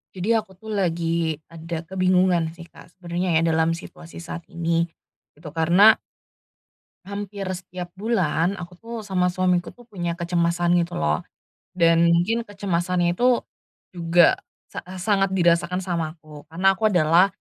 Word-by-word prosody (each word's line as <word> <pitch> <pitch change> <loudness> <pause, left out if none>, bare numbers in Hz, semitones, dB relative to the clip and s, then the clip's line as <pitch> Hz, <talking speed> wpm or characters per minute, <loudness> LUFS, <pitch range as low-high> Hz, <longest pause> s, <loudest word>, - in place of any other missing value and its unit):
Jadi 185 +3 -4
aku 210 -3 -10
tuh 220 +4 -9
lagi 170 -4 0 0.2
ada 165 0 -6
kebingungan 185 -2 +2
sih 170 - -10
Kak - - -15
sebenernya 180 0 -3
ya 160 - +4
dalam 165 0 +2
situasi 170 -1 -11
saat 170 0 -7
ini, 170 0 0 0.5
itu 155 +1 -10
karena 170 +7 +5 1.1
hampir 200 0 -6
setiap 180 -1 -7
bulan 190 -4 0
aku 175 0 -8
tuh 230 +1 -8
sama 185 -2 +1
suamiku 180 -1 +1
tuh 245 - -17
punya 175 -6 -3
kecemasan 170 0 +1
gitu 170 - -4
lho. 75 0 +1 0.5
Dan 165 -1 +4
mungkin 175 +8 +2
kecemasannya 180 -3 0
itu 245 0 +3 0.5
juga 170 -1 +4 0.3
sa - - -5 0.2
sangat 195 0 +1
dirasakan 175 +1 +2
sama 170 -3 -3
aku 155 -1 -14
karena 175 +4 0
aku 220 +3 +2
adalah, 175 0 +4
175 Hz, 140 wpm, -23 LUFS, 165-190 Hz, 1.1 s, karena